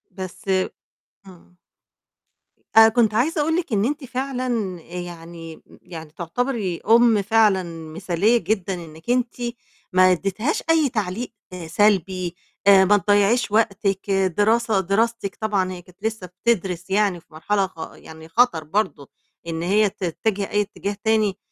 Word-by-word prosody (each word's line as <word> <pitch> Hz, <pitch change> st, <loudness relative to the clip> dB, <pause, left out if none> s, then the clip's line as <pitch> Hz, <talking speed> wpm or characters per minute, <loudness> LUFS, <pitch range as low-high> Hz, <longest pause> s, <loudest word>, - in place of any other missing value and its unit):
بس 185 Hz, -2 st, -8 dB, 0.8 s
إمم. 180 Hz, -1 st, -17 dB, 1.2 s
آآ، 225 Hz, 0 st, +9 dB
كنت 225 Hz, -2 st, +2 dB
عايزة 295 Hz, +8 st, +1 dB
أقول 320 Hz, +2 st, +1 dB
لِك 335 Hz, -9 st, -3 dB
إن 205 Hz, +1 st, +2 dB
أنتِ 290 Hz, +1 st, -2 dB
فعلًا 250 Hz, -8 st, -3 dB
يعني 170 Hz, -2 st, -9 dB, 0.2 s
يعني 160 Hz, -3 st, -10 dB
تُعتبري 195 Hz, 0 st, -2 dB
أم 230 Hz, -2 st, +5 dB
فعلًا 210 Hz, -2 st, +3 dB, 0.3 s
مثالية 185 Hz, +6 st, +1 dB
جدًا 200 Hz, -4 st, -1 dB
إنِّك 165 Hz, 0 st, -10 dB
أنتِ 245 Hz, -1 st, +1 dB, 0.6 s
ما 185 Hz, 0 st, +6 dB
ادّيتهاش 195 Hz, -, -1 dB
أي 315 Hz, -4 st, +4 dB
تعليق 215 Hz, +1 st, -3 dB, 0.4 s
سلبي، 185 Hz, -1 st, +1 dB, 0.3 s
آآ، 195 Hz, -1 st, +8 dB
ما 205 Hz, +2 st, +5 dB
تضيّعيش 205 Hz, +4 st, +2 dB
وقتِك، 200 Hz, -2 st, 0 dB
دراسة 205 Hz, +3 st, +2 dB
دراستِك 200 Hz, +2 st, 0 dB
طبعًا 200 Hz, -4 st, 0 dB
هي 180 Hz, -1 st, -7 dB
كنت 180 Hz, +3 st, -22 dB
لسّه 220 Hz, -4 st, -3 dB
بتدرِس 185 Hz, -2 st, -2 dB
يعني 195 Hz, -2 st, +1 dB
في 165 Hz, -, -26 dB
مرحلة 195 Hz, +5 st, 0 dB
خ 165 Hz, -3 st, -9 dB
يعني 160 Hz, 0 st, -13 dB
خَطَر 195 Hz, -5 st, +2 dB
برضه 155 Hz, -5 st, -2 dB, 0.4 s
إن 165 Hz, -1 st, -3 dB
هي 205 Hz, +3 st, +3 dB
تتِّجِه 195 Hz, +3 st, -2 dB
أي 210 Hz, -, +2 dB
اتجاه 200 Hz, 0 st, -4 dB
تاني 215 Hz, -3 st, +2 dB
200 Hz, 135 wpm, -22 LUFS, 180-225 Hz, 1.2 s, آآ